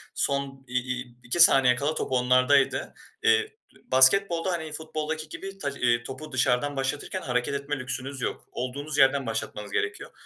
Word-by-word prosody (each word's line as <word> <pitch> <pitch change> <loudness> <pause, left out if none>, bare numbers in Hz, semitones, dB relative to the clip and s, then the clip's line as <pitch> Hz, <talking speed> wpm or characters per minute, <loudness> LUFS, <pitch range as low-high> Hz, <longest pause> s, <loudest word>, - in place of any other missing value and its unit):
son 135 -1 -2
i 125 +1 0 0.2
i 125 -1 -13
iki 125 +8 -3
saniye 135 -6 +7
kala 145 +4 -1
top - - -3
onlardaydı. 130 +2 +3 0.3
Eee, 445 -1 +3 0.4
basketbolda, 170 +7 +4
hani, 160 -3 -4
futboldaki 155 0 -4
gibi 195 +4 -8
taç, 140 -7 -3
iii, 120 -1 +2
topu 135 +5 -8
dışarıdan 130 +2 +1
başlatırken 140 +7 -3
hareket 125 -1 -1
etme 140 0 -3
lüksünüz 130 +1 -4
yok. - - -3
Olduğunuz 140 +4 -4
yerden 135 0 +4
başlatmanız 110 -2 -4
gerekiyor. - - -3
135 Hz, 150 wpm, -26 LUFS, 125-155 Hz, 0.4 s, saniye